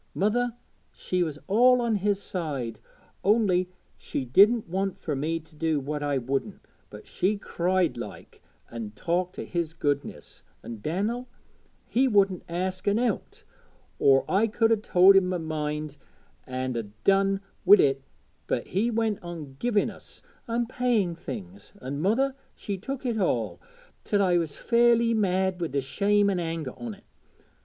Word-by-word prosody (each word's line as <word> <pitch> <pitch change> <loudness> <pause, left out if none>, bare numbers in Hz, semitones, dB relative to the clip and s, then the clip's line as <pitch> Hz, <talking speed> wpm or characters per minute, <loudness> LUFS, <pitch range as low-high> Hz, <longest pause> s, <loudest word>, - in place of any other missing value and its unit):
Mother, 235 +4 +1 0.4
she 180 -1 -2
was 155 -4 -1
all 250 +5 +5
on 235 -3 +1
his 200 0 0
side, 140 - -4 0.4
only 195 -4 +3 0.3
she 135 - -4
didn't 205 - +5
want 190 +2 -2
fur 155 -6 -3
me 160 +4 -1
to 160 0 -22
do 160 -1 0
what 145 +2 -4
I 145 -1 0
wouldn't; 135 - -3 0.3
but 105 - -11
she 205 +3 0
cried 180 -7 0
like, 120 - -9 0.3
an' 115 -3 -6
talked 175 - -1
o' - - -4
his 170 -2 -3
goodness 145 -3 -3 0.2
an' 115 -2 -7
Dan'el, 210 - -2 0.6
he 260 +3 +2
wouldn't 195 -5 +3
ask 185 +2 -3
out - - +5
an' 205 - +1
out, 235 -3 -2 0.6
or 135 -1 +5
I 205 +4 +2
could 225 +1 +2
'a 225 - +5
told 195 -2 +5
him 195 -1 +5
my 180 0 -1
mind 150 -2 -4 0.5
an' 130 0 -3
'a 115 - -1 0.2
done 195 0 +3 0.2
wi' 205 - +9
it; 135 -7 +2 0.5
but - - -2
he 210 +6 +1
went 220 -2 0
on 165 -6 -8
giving 230 -4 +1
us, - - -14 0.2
an' 235 +1 0
paying 235 -7 0
things, 185 +3 -9
an' 140 +2 -5
mother 255 +9 +2 0.2
she 200 - -4
took 265 +8 -6
it 235 -3 0
all, 110 - -1 0.4
till 200 -1 +1
I 180 -2 +3
was 160 -4 -3
fairly 235 -1 +3
mad 190 -3 +1
wi' 170 - 0
the 140 -1 -1
shame 200 +10 +2
an' 185 - -1
anger 165 -5 -3
on't. 220 -4 -8
185 Hz, 160 wpm, -27 LUFS, 150-210 Hz, 0.6 s, wi